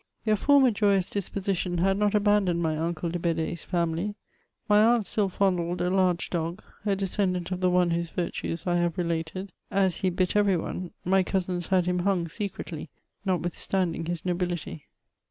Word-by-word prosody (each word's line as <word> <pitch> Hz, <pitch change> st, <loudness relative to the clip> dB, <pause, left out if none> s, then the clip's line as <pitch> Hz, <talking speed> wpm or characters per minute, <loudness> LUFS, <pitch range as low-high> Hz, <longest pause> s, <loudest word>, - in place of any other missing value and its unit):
Their 215 Hz, -1 st, +4 dB
former 275 Hz, +2 st, +5 dB
joyous 200 Hz, -3 st, +2 dB
disposition 195 Hz, -2 st, -2 dB
had 195 Hz, +3 st, +2 dB
not 205 Hz, +1 st, +1 dB
abandoned 205 Hz, -4 st, +3 dB
my 160 Hz, -1 st, +1 dB
unde 165 Hz, +1 st, -2 dB
de 175 Hz, -, -2 dB
Bedee's 165 Hz, -1 st, -1 dB
family; 170 Hz, +3 st, -1 dB, 0.5 s
my 210 Hz, -1 st, +5 dB
aunt 230 Hz, -1 st, +4 dB
still 205 Hz, -1 st, 0 dB
fondled 180 Hz, -2 st, 0 dB
a 180 Hz, -, 0 dB
large 185 Hz, -2 st, +1 dB
dog, 170 Hz, +3 st, -3 dB, 0.2 s
a 200 Hz, -, +3 dB
descendant 190 Hz, -2 st, -1 dB
of 185 Hz, 0 st, -3 dB
the 185 Hz, -, +3 dB
one 180 Hz, -1 st, +3 dB
whose 170 Hz, 0 st, -1 dB
virtues 170 Hz, -1 st, -3 dB
I 175 Hz, -1 st, +2 dB
have 175 Hz, 0 st, 0 dB
related; 170 Hz, +2 st, -2 dB, 0.2 s
as 190 Hz, -3 st, +2 dB
he 190 Hz, -, +1 dB
bit 180 Hz, +1 st, 0 dB
every 205 Hz, -3 st, +4 dB
one, 180 Hz, +2 st, -4 dB, 0.2 s
my 190 Hz, +2 st, +4 dB
cousins 180 Hz, -2 st, -2 dB
had 185 Hz, -2 st, +2 dB
him 180 Hz, 0 st, 0 dB
hung 180 Hz, -2 st, +1 dB
secretly, 170 Hz, -4 st, -5 dB, 0.4 s
notwithstanding 175 Hz, -1 st, 0 dB
his 175 Hz, -1 st, -4 dB
nobility. 175 Hz, -4 st, -3 dB
180 Hz, 170 wpm, -27 LUFS, 170-195 Hz, 0.5 s, former